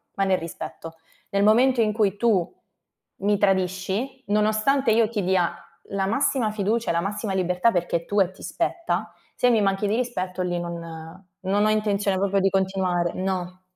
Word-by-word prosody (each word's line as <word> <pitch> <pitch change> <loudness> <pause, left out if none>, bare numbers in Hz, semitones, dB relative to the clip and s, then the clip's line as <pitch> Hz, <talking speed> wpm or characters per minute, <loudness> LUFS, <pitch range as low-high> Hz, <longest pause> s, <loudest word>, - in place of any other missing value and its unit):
ma 195 - +1
nel 190 -1 +2
rispetto. 165 0 -8 0.3
Nel 200 0 +1
momento 245 +4 +4
in 215 -1 +2
cui 205 -2 +1
tu, 200 -6 +1 0.7
mi 205 0 +3
tradisci, 195 +6 0
nonostante 215 +5 +2
io 225 0 +4
ti 210 -4 -2
dia 180 -2 +1 0.3
la 195 -1 -1
massima 230 -1 +1
fiducia, 215 +2 -1
e - - +2
la 170 - +1
massima 205 +1 -3
libertà 180 +4 +2
perché 175 -1 0
è 170 - -9
tua 205 -1 +3
e 180 - -10
ti 190 - -15
spetta, 340 0 -2 0.2
se 250 - +3
mi 225 -3 +3
manchi 195 +1 +1
di 210 - +1
rispetto 190 -7 -2
lì 175 -1 -1
non 170 0 -7 0.2
non 200 +2 +2
ho 215 - +3
intenzione 205 -2 +1
proprio 195 +1 +1
di 195 - +3
continuare 190 -3 0
no. 185 -1 -3
195 Hz, 180 wpm, -24 LUFS, 185-215 Hz, 0.7 s, momento